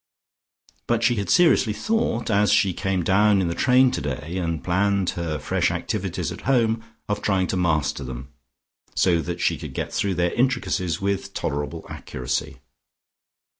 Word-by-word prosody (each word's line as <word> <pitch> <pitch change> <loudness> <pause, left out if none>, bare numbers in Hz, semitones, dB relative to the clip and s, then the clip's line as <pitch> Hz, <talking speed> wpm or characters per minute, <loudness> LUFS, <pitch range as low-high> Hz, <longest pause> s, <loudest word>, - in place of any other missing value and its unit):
But 120 -1 +1
she 120 0 +3
had 100 - -2
seriously 160 -10 +4
thought, 220 - -1
as 105 0 +3
she 95 -3 +3
came 95 -1 -1
down 100 +3 +4
in 90 -3 0
the - - -1
train 130 +5 +4
today 75 - -4
and 85 -3 -2
planned 95 +1 +1
her 85 -3 -3
fresh 75 - 0
activities - - -3
at - - -8
home 115 -3 +2 0.2
of 105 0 -2
trying 95 -3 +1
to - - 0
master 75 -5 0
them, 65 +1 -8 0.6
so 85 -3 +3
that 85 +1 -5
she - - +1
could - - -8
get - - -3
through 100 -2 0
their 85 0 0
intricacies 115 -8 0
with 100 0 -2
tolerable 75 +1 -3
accuracy. 65 0 -4
95 Hz, 160 wpm, -23 LUFS, 85-105 Hz, 0.6 s, seriously